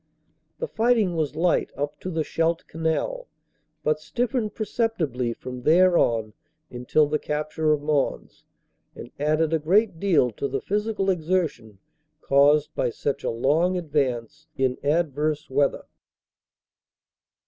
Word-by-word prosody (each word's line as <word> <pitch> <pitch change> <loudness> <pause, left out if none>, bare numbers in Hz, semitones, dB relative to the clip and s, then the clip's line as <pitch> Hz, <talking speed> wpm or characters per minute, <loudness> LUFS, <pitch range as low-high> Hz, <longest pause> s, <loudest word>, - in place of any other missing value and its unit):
"The 485 - -3
fighting 225 - +2
was 155 -2 -1
light 170 +2 +1
up 145 +1 -3
to 185 - -5
the 160 -3 -1
Scheldt 165 +2 -1
Canal, 165 - -2 0.6
but 155 0 +1
stiffened 220 - -2
perceptibly 170 - -1
from 125 +2 -7
there 175 +6 +5
on 110 -7 +1 0.4
until 125 +5 +2
the 150 +1 -1
capture 155 +1 -1
of 150 -1 0
Mons, 150 -2 -1 0.5
and 120 - -10
added 155 +2 +1
a 160 - +2
great 185 +3 +2
deal 165 -11 +3
to 140 - -3
the 135 0 -2
physical 205 - -1
exertion 160 - -2 0.4
caused 145 +2 +3
by - - 0
such 140 +4 -3
a - - 0
long 155 +10 +1
advance 145 -2 -2
in 130 -1 0
adverse 150 -1 0
weather. 140 +1 +1
155 Hz, 130 wpm, -24 LUFS, 140-180 Hz, 0.6 s, there